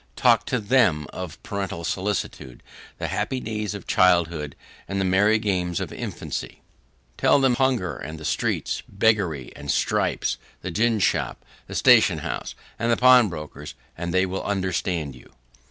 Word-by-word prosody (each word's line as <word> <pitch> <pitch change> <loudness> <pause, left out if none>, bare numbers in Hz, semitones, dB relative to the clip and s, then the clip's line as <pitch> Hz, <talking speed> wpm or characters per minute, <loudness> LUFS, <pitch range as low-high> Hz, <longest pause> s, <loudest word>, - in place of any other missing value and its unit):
Talk - - +3
to 125 - 0
THEM 100 - +3
of 90 -4 -6
parental 95 -4 -4
solicitude, 95 -9 -3 0.3
the - - -3
happy 130 - -2
days 105 -3 -3
of 100 - -8
childhood, 85 -5 +2 0.3
and 100 0 -2
the 95 - +1
merry 100 +4 +4
games 90 -5 -1
of - - -5
infancy! - - -6 0.5
Tell - - +4
them 135 -1 +4
of 120 - 0
hunger 130 -9 +1
and 80 0 -7
the 80 - -8
streets, - - -1
beggary 95 - +1
and 70 - -9
stripes, - - 0 0.3
the 95 - -4
gin 115 +5 +2
shop, 100 - 0 0.2
the - - -7
station - - +5
house, - - -4 0.2
and 115 +1 +1
the 115 - +3
pawnbroker's, 90 - +3 0.2
and 85 +1 -4
they 95 +1 +3
will 95 +1 -3
understand 90 -6 -2
you. 65 - -17
95 Hz, 155 wpm, -24 LUFS, 85-110 Hz, 0.5 s, station